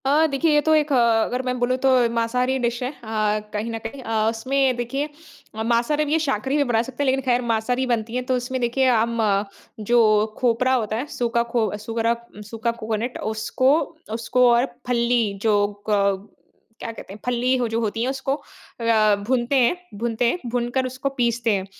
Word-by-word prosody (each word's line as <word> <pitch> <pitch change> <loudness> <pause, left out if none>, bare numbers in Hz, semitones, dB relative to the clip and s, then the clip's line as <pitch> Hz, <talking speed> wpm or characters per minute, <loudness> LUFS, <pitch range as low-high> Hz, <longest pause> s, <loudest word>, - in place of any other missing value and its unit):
अ, 295 +4 +4
देखिए 300 +2 +1
ये 295 - +4
तो 315 - +5
एक 300 -1 +1
अ, - - +4 0.3
अगर 250 +1 -2
मैं 250 0 -1
बोलूँ 245 +1 +1
तो 265 +1 +2 0.2
मांसाहारी 250 +3 0
डिश 240 0 -1
है 250 - -1
अ, 215 -5 -1
कहीं 215 +2 -2
न 225 - -3
कहीं 225 +5 -7
अ, 220 -1 +1
उसमें 260 +3 +1
देखिए 270 +5 -2 0.6
मांसाहारी 240 +6 +1
भी 290 - -4
ये 320 - +3
शाकाहारी 270 -2 -1
भी 290 - +3
बना 235 -4 +1
सकते 260 +3 -4
हैं - - 0
लेकिन 265 0 +2
खैर 245 -1 +2
मांसाहारी 245 +4 0
बनती 230 -1 -1
है 250 - 0
तो - - +3
उसमें 250 +1 -3
देखिए 245 +2 +1
हम 230 -1 +1 0.7
जो 240 0 +5 0.4
खोपरा 255 +1 +2
होता 220 -4 0
है 240 +5 -2
सूखा 235 -1 +1
खो 230 -3 +1
सूखरा 225 +2 -1 0.4
सूखा 225 +1 -1
कोकोनट 225 +2 -3 0.2
उसको 255 +5 +2 0.4
उसको 240 +2 +2
और 240 +2 +3 0.2
फल्ली 240 -1 +2 0.2
जो 205 -2 +3 0.2
क 200 -1 +1 0.5
क्या - - -4
कहते 210 -3 -10
हैं 210 - -11
फल्ली 250 +1 +1
हो 245 -2 0
जो 225 +1 -1
होती 225 +1 -1
है 255 - 0
उसको 270 0 -2
अ, 230 -6 0
भूनते 250 +1 +1
हैं 255 +4 +4 0.2
भूनते 235 +1 0
हैं, 355 - -2
भूनकर 245 +2 -1
उसको 260 +2 -3
पीसते 235 -1 +1
हैं। 190 -1 -1
240 Hz, 195 wpm, -23 LUFS, 225-260 Hz, 0.7 s, तो